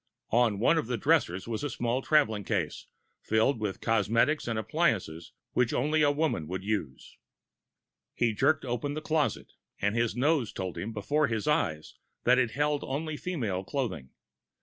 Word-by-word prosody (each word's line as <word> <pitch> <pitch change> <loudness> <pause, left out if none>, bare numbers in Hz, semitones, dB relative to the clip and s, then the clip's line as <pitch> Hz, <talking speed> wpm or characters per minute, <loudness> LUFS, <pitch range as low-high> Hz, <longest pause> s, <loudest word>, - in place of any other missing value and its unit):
On 115 -3 +3
one 150 +10 +3
of 135 - -3
the 125 -1 -1
dressers 90 -2 +1
was 115 +1 -3
a 145 - -1
small 120 +1 -1
traveling 130 -9 +2
case, 90 -8 -2 0.3
filled 110 +3 +2
with 105 -3 -1
the - - -16
cosmetics 115 +7 +2
and 115 -2 -1
appliances 110 - -1 0.2
which 125 -2 +1
only 150 +5 +2
a 145 - +5
woman 145 - 0
would 95 +2 -4
use. 100 -11 -4 1.0
He 115 -2 +1
jerked 140 +6 +2
open 125 +4 -2
the 155 - -4
closet, 155 -2 -1 0.3
and 105 +2 0
his 115 -2 +1
nose 135 -2 +1
told 95 -2 -4
him 95 +7 -4
before 140 +8 +1
his 110 -1 -2
eyes 80 - -1 0.2
that 125 +1 +5
it 125 -2 +2
held 145 +4 0
only 150 +3 -3
female 115 - -3
clothing! 95 - -3
115 Hz, 170 wpm, -29 LUFS, 105-145 Hz, 1.0 s, a